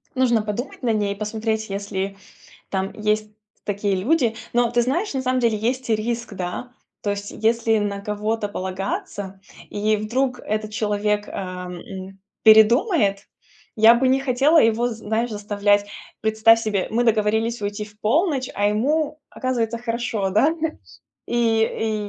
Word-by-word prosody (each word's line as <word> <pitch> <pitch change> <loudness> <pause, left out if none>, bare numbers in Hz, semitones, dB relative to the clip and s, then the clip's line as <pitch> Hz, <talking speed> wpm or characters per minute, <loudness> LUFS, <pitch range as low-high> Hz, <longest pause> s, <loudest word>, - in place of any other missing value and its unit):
Нужно 240 -3 +3
подумать 225 +7 -5
над 230 -3 +2
ней, 200 -1 -1
посмотреть, 220 +1 -2
если 195 0 -3 0.5
там 190 0 -2
есть 215 0 -1 0.3
такие 200 -1 0
люди. 235 - +1 0.2
Но, 240 -1 +2
ты 240 0 +3
знаешь, 320 - -1
на 265 - -1
самом 255 0 +1
деле 230 -2 +2
есть 245 +3 -2
риск, 230 +1 -1
да. 185 +7 -5 0.3
То 205 - -2
есть, 200 0 -5
если 225 0 +1
на 205 -1 -2
кого-то 210 +1 -2
полагаться, 190 0 -5 0.3
и 215 +1 +1
вдруг 250 +4 -1
этот 215 -1 -3
человек, 210 -1 0
э, - - -9
м, 185 +1 -7 0.2
передумает, 220 - +5 0.5
я 225 0 +7
бы 260 +2 +2
не 260 +1 +3
хотела 275 +4 +3
его, 230 +2 +2
знаешь, 225 +1 -2
заставлять. 205 0 +1 0.3
Представь 220 +1 +5
себе, 210 -4 -1
мы 235 +2 +2
договорились 220 +1 +1
уйти 205 +1 -3
в 210 0 -18
полночь, 275 - +1
а 205 0 +1
ему, 295 +8 0
оказывается, 235 -3 -2
хорошо, 230 -4 -2
да? 215 +10 +4
Ш 320 -1 -3 0.5
и, 225 -2 0
220 Hz, 145 wpm, -22 LUFS, 205-240 Hz, 0.5 s, я